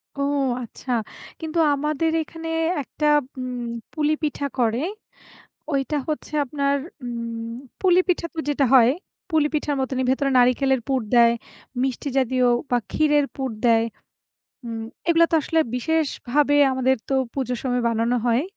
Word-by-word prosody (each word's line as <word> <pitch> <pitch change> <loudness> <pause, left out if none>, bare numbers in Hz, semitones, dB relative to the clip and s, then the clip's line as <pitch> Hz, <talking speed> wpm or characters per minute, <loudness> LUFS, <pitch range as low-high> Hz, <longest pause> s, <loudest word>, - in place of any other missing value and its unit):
ও! 280 - -4 0.4
আচ্ছা। 245 +2 -8 0.5
কিন্তু 320 +1 -2 0.2
আমাদের 300 +3 0
এখানে 325 +1 -8 0.3
একটা 300 +3 -2 0.3
উম 250 -1 -4 0.3
পুলি 305 -1 +1
পিঠা 290 -1 -1
করে। 235 +1 +2 0.9
ওইটা 275 +2 0
হচ্ছে 305 0 -4
আপনার 280 +1 0 0.3
উম 230 -1 -5 0.3
পুলি 365 -1 +5
পিঠা 345 -1 +1
তো - - -10
যেটা 285 -1 +2
হয়, 245 -2 +7 0.4
পুলি 315 -2 +3
পিঠার 295 -1 0
মতই 260 0 -1
ভেতরে 275 +1 +1
নারিকেলের 255 +1 +3
পুর 265 -1 +1
দেয়, 235 -1 +6 0.5
মিষ্টি 265 +2 -2
জাতীয় 255 -1 +2 0.2
বা 245 - +3
ক্ষীরের 295 -2 +3
পুর 265 -1 -2 0.2
দেয়। 225 -1 +4 0.8
উম 225 -1 -4 0.3
এগুলা 335 0 +5
তো - - +1
আসলে 325 +3 +1 0.2
বিশেষভাবে, 290 0 +1 0.2
আমাদের 260 0 +2
তো 270 - 0 0.2
পুজোর 250 -3 -2
সময় 250 -2 0
বানানো 230 +2 +1
হয়। 240 +2 +3
270 Hz, 140 wpm, -23 LUFS, 245-300 Hz, 0.9 s, হয়